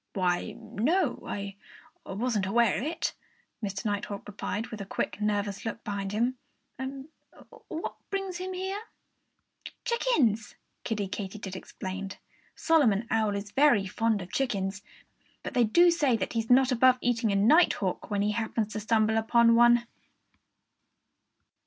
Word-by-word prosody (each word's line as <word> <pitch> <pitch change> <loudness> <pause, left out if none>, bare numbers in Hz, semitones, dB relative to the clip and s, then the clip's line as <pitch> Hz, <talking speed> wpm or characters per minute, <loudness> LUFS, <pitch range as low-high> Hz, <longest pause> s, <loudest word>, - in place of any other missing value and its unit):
"Why, 180 -2 0
no! 295 - 0
I 200 -1 -5 0.5
wasn't 210 -1 -1
aware 230 0 +3
of - - -4
that," 325 +3 -2 0.5
Mr. 195 +2 -4
Nighthawk 205 -1 -3
replied 210 +2 -4
with 220 -2 -7
a - - -5
quick, 210 - -3
nervous 205 -1 -1
look 225 0 -5
behind 200 -2 -3
him. 240 +4 0 1.3
"What 320 - -4 0.2
brings 390 -2 -3
him 370 +1 -5
here?" 380 +2 -3 1.0
"Chickens!" 290 - +1 0.3
Kiddie 210 -4 -2
Katydid 195 0 -6
explained. 190 +1 -6 0.4
"Solomon 235 -10 +3
Owl 220 -3 +2
is 200 0 -5
very 275 -7 +4
fond 215 +1 0
of 180 - -12
chickens. 200 -6 -1 0.6
But - - -5
they 245 -2 +4
do 345 +11 +5
say 285 -8 +2
that - - -3
he's 225 -1 -2
not 260 +1 +5
above 255 +1 +5
eating 235 -3 +1
a - - +1
nighthawk 210 - +3
when 205 -1 0
he 210 - +1
happens 220 -1 -2
to 215 - -3
stumble 220 0 +2
upon 230 +1 +4
one." 240 0 +5
220 Hz, 140 wpm, -28 LUFS, 200-250 Hz, 1.3 s, do